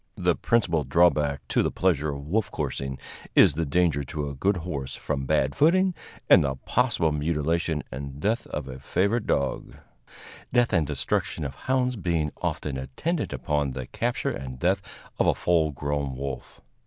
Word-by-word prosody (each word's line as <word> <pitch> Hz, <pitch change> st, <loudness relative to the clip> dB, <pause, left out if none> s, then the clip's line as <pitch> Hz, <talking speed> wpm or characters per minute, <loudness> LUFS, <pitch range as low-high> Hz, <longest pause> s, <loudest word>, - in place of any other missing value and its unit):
The -, -, +2 dB
principal 85 Hz, -10 st, +1 dB
drawback 75 Hz, -1 st, +2 dB
to -, -, +3 dB
the -, -, +1 dB
pleasure 80 Hz, -5 st, +1 dB
of 70 Hz, 0 st, -5 dB
wolf 105 Hz, +6 st, 0 dB
coursing 70 Hz, -5 st, -3 dB, 0.4 s
is -, -, +7 dB
the 80 Hz, +1 st, -2 dB
danger 80 Hz, -1 st, +2 dB
to 75 Hz, 0 st, -3 dB
a -, -, -5 dB
good 95 Hz, +8 st, +1 dB
horse 70 Hz, -6 st, -4 dB
from 70 Hz, -3 st, -3 dB
bad 70 Hz, -2 st, +2 dB
footing, 185 Hz, +5 st, +4 dB, 0.3 s
and -, -, +7 dB
the 70 Hz, -1 st, -1 dB
possible 80 Hz, +4 st, +1 dB
mutilation 80 Hz, +1 st, 0 dB
and 70 Hz, +2 st, -6 dB
death 110 Hz, +8 st, 0 dB
of 75 Hz, -3 st, -5 dB
a 65 Hz, 0 st, -7 dB
favorite 100 Hz, -, 0 dB
dog 70 Hz, -2 st, -1 dB, 0.8 s
death 120 Hz, -2 st, +3 dB
and 80 Hz, -5 st, +3 dB
destruction 70 Hz, +2 st, -1 dB
of 70 Hz, -, -4 dB
hounds 125 Hz, -, 0 dB
being 85 Hz, -6 st, 0 dB
often 70 Hz, -3 st, -2 dB
attendant 105 Hz, -, -2 dB
upon 75 Hz, -3 st, -1 dB
the 65 Hz, -1 st, -5 dB
capture -, -, -1 dB
and 65 Hz, -1 st, -6 dB
death 95 Hz, +7 st, +1 dB, 0.4 s
of -, -, +3 dB
a -, -, +4 dB
full 80 Hz, -3 st, +2 dB
grown 70 Hz, -1 st, -2 dB
wolf. 65 Hz, -2 st, -6 dB
75 Hz, 165 wpm, -26 LUFS, 70-90 Hz, 0.8 s, is